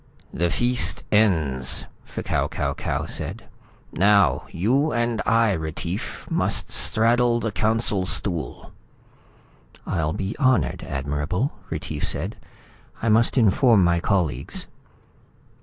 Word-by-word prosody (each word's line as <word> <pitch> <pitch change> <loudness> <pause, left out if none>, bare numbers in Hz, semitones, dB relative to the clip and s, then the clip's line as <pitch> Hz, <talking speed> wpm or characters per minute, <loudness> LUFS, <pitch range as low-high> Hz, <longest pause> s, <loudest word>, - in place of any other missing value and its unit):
"The 85 +1 +1
feast 120 +5 +1
ends," 80 - +1 0.2
F'Kau - - -1
Kau - - -2
Kau - - -2
said. - - -6 0.5
"Now 100 +2 +3
you 130 - +1
and 120 -1 0
I, 115 -2 +4
Retief, 85 +2 -4
must - - -1
straddle 120 +1 +2
the 115 -1 -2
Council 105 -2 0
Stool." 85 -5 -4 1.1
"I'll 80 -4 -1
be 95 +4 -3
honored, 130 - +2
Admirable," 75 - -2 0.2
Retief - - -4
said. - - -1 0.7
"I 115 - +2
must 115 +5 +4
inform 115 -1 +5
my 85 0 +3
colleagues." 85 - -1
100 Hz, 110 wpm, -23 LUFS, 85-115 Hz, 1.1 s, inform